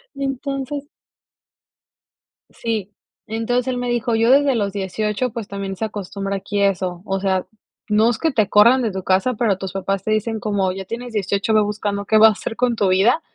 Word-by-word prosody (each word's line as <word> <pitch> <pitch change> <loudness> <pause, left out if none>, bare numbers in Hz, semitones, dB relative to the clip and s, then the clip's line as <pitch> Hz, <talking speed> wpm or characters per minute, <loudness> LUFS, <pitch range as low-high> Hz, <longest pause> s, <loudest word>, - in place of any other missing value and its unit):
Y 275 - -4
entonces 275 +1 -3 1.7
Sí, 220 -4 -4 0.4
entonces 235 +3 -1
él 255 -1 -1
me 245 0 -2
dijo 240 -1 0
yo 225 +1 +3
desde 275 -1 +4
los 200 -3 -1
18, 210 +4 -2
pues 225 -3 -6
también 195 -1 -5
se 220 - -2
acostumbra 200 -1 -4
aquí 200 +1 -3
eso, 185 -3 0
o 195 -2 -1
sea, 190 -1 0 0.4
no 215 +2 +4
es 240 - -1
que 325 - 0
te 215 -6 +1
corran 235 +5 +6
de 225 -3 0
tu 190 -1 -5
casa, 190 +8 +2
pero 215 -4 +1
tus 190 -1 -6
papás 195 0 -2
te 215 - -2
dicen 220 +1 0
como 200 -3 0
ya 190 +1 -6
tienes 235 +3 -6
18, 200 +1 0
ve 215 - +5
buscando 205 -1 -2
qué 220 - +3
vas 220 +1 +8
a - - +2
hacer 225 - -6
con 245 0 +1
tu 205 -3 +1
vida 200 - +3
215 Hz, 200 wpm, -20 LUFS, 195-240 Hz, 1.7 s, vas